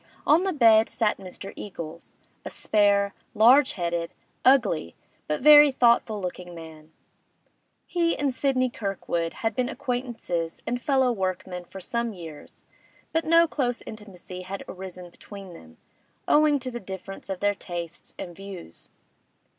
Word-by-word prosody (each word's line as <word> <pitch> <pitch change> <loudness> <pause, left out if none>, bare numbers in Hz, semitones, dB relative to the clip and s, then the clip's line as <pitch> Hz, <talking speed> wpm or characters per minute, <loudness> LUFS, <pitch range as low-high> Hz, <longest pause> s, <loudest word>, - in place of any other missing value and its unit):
On 315 +4 +5
the 385 0 0
bed 225 -7 +5
sat 220 -3 0
Mr. 195 +1 -8
Eagles, 170 -4 -8 0.3
a - - -5
spare, 200 -1 +2 0.2
large 255 +6 +6
headed, 170 -2 -2 0.3
ugly, 215 - +3 0.3
but 150 - -1
very 295 0 +9
thoughtful 235 -4 +3
looking 180 -1 -6
man; 160 -1 -12 0.9
he 335 -2 0
and 280 -2 0
Sidney 255 -1 +1
Kirkwood 185 -6 -2
had 225 - +2
been 250 +3 -1
acquaintances 240 - -3
and 245 +1 -2
fellow 265 -1 +2
workmen 185 -3 -3
for 190 - -10
some 235 +4 -2
years, 165 -5 -11 0.5
but 325 0 +1
no 335 +1 +5
close 245 -6 -1
intimacy 190 -4 -9
had 190 +2 -6
arisen 180 -1 -8
between 195 0 -11
them, 80 - -15 0.5
owing 300 -1 +5
to 255 -1 -5
the 240 - -5
difference 195 -1 -8
of 190 -2 -3
their 205 0 +2
tastes 170 -3 -7
and 175 -1 -7
views. 195 - -10
200 Hz, 140 wpm, -26 LUFS, 180-250 Hz, 0.9 s, very